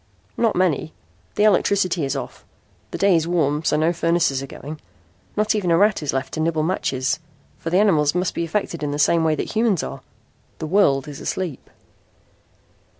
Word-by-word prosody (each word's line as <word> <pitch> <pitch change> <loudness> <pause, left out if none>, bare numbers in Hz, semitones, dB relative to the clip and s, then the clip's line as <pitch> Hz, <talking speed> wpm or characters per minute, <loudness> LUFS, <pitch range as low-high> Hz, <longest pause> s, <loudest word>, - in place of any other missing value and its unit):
"Not 230 -2 +1
many. 175 -4 0 0.4
The 210 - +2
electricity 190 -4 +2
is 135 +1 -2
off. 135 - -6 0.5
The - - -5
day 195 -2 +4
is 165 0 +1
warm 155 -3 +1
so 150 - +2
no 160 +3 +2
furnaces 165 -5 +1
are 135 - -6
going. 150 +3 -9 0.6
Not 215 +1 +2
even 205 -5 -1
a 165 - +4
rat 205 +1 +3
is 150 - -1
left 135 0 -3
to - - -3
nibble 160 -1 0
matches, 135 -6 -1 0.4
for 165 - -4
the 180 - +2
animals 160 -7 +3
must 180 0 0
be - - -2
affected 170 -1 -2
in 150 - -2
the 145 - -2
same 160 +2 +3
way 160 -1 +2
that - - -4
humans 220 -6 +2
are. - - -6 0.6
The - - -5
world 155 -6 +2
is 145 -2 -8
asleep." 175 -8 -4
165 Hz, 190 wpm, -22 LUFS, 150-185 Hz, 0.6 s, day